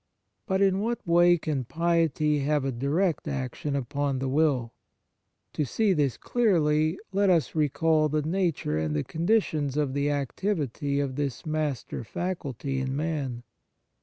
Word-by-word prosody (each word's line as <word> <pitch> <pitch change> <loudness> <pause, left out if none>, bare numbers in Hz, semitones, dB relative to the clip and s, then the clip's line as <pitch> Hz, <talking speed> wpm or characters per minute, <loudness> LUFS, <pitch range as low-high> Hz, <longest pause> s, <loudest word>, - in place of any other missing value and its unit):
But 190 -1 +2
in 195 -1 +3
what 235 +3 -2
way 175 0 +5
can 150 -5 -2
piety 160 -1 +1
have 145 0 +1
a 135 - 0
direct 150 +8 0
action 140 +1 -3
upon 140 +1 -1
the 135 +1 -2
will? 135 -4 +1 0.8
To 150 - 0
see 200 - +1
this 145 -6 0
clearly, 160 -8 +2
let 200 0 +2
us 170 -4 +2
recall 155 +1 +2
the 150 0 0
nature 165 - 0
and 80 -1 -1
the 75 - 0
conditions 160 -6 0
of 145 -3 0
the 140 +1 0
activity 145 - -1
of 135 -2 -2
this 140 -4 -3
master 155 -6 -2
faculty 140 - -3
in 130 0 -2
man. 140 -6 -2
150 Hz, 145 wpm, -27 LUFS, 135-170 Hz, 0.8 s, way